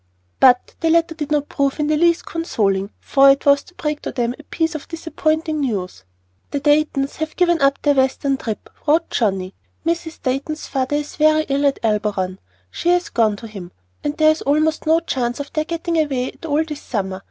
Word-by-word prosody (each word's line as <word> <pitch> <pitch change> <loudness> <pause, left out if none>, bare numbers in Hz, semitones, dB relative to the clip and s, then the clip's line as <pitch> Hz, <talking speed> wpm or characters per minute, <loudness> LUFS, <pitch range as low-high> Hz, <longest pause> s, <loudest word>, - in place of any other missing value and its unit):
But 250 -1 +5
the 330 - +1
letter 330 0 +3
did 305 -2 -5
not 290 -1 +1
prove 280 +1 -1
in 300 - +1
the 305 +1 +2
least 335 +2 +2
consoling, 200 - -1
for 275 0 +5
it 275 0 +3
was 280 0 +5
to 355 - -19
break 300 -3 -3
to - - -4
them 240 -2 -1
a 270 - -13
piece 325 0 -1
of 310 - -7
disappointing 315 -1 -1
news. 190 - -3 0.4
"The 285 - -2
Daytons 290 -1 +1
have 315 0 -4
given 345 -3 +2
up 275 0 +3
their 290 - +4
Western 270 0 +1
trip," 220 -5 -5 0.2
wrote 320 +3 +2
Johnnie. 195 -4 0 0.3
"Mrs. 335 -1 -2
Dayton's 275 +4 -2
father 265 +1 -1
is 295 0 -4
very 310 0 +4
ill 280 +1 +2
at 275 - +1
Elberon; 205 -4 -1 0.3
she 345 - -1
has 355 0 +2
gone 220 -3 +2
to 225 +3 -9
him, 195 -5 -9 0.3
and 295 0 -2
there 310 0 +6
is 310 - -3
almost 310 +3 +1
no 325 +1 +4
chance 245 -6 -2
of 285 - -6
their 310 0 0
getting 335 0 -1
away 270 -5 0
at 330 - -10
all 300 +1 +2
this 300 -2 -7
summer. 190 -4 -3
290 Hz, 205 wpm, -20 LUFS, 250-315 Hz, 0.4 s, there